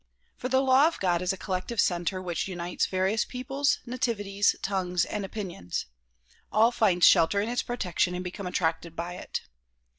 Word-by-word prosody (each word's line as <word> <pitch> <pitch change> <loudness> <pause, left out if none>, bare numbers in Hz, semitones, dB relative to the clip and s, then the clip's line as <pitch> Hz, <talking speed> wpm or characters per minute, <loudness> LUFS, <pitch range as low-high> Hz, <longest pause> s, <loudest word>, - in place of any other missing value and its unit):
For 255 - -4
the 260 +1 +3
law 270 +2 +5
of 330 - -3
God 175 -2 +1
is 180 - +1
a 190 - -4
collective 185 +4 -3
center 175 +1 +1
which 175 -1 -2
unites 175 -2 -2
various 190 +3 +1
peoples, 275 +3 -1
nativities, 205 -5 0
tongues 180 -2 0
and 210 - -4
opinions. 190 - -5 0.7
All 225 +3 +5
find 190 -7 +2
shelter 165 +5 +6
in 205 - 0
its 245 - 0
protection 180 -6 -1
and 180 - -4
become 180 +1 -6
attracted 165 -2 -1
by 170 +1 -4
it. - - -5
190 Hz, 170 wpm, -27 LUFS, 180-235 Hz, 0.7 s, shelter